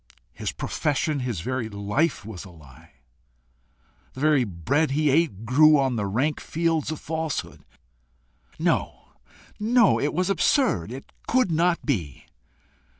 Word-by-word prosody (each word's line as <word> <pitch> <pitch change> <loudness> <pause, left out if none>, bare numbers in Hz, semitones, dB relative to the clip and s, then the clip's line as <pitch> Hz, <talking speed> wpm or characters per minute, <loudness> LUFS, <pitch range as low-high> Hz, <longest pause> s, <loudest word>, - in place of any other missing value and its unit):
his - - -4
profession, 150 0 -1
his 120 -9 -3
very 130 +2 -3
life 105 +9 -1
was 105 -5 -8
a 95 - -12
lie! 80 -1 -17 1.2
the - - -10
very 150 -2 +3
bread 120 - 0
he 150 +1 +2
ate 135 - +1
grew 150 +6 +6
on 135 -3 +1
the 105 -3 -1
rank 130 +10 0
fields 165 -2 -1
of 155 - -4
falsehood! 160 -1 -4 0.9
No, - - -1 0.5
no; 230 0 +4
it 145 - 0
was 185 +4 0
absurd! 195 - +1
it 135 +2 -9 0.2
could 255 -7 +2
not 170 +2 +1
be! 85 - -3
140 Hz, 135 wpm, -25 LUFS, 105-160 Hz, 1.2 s, grew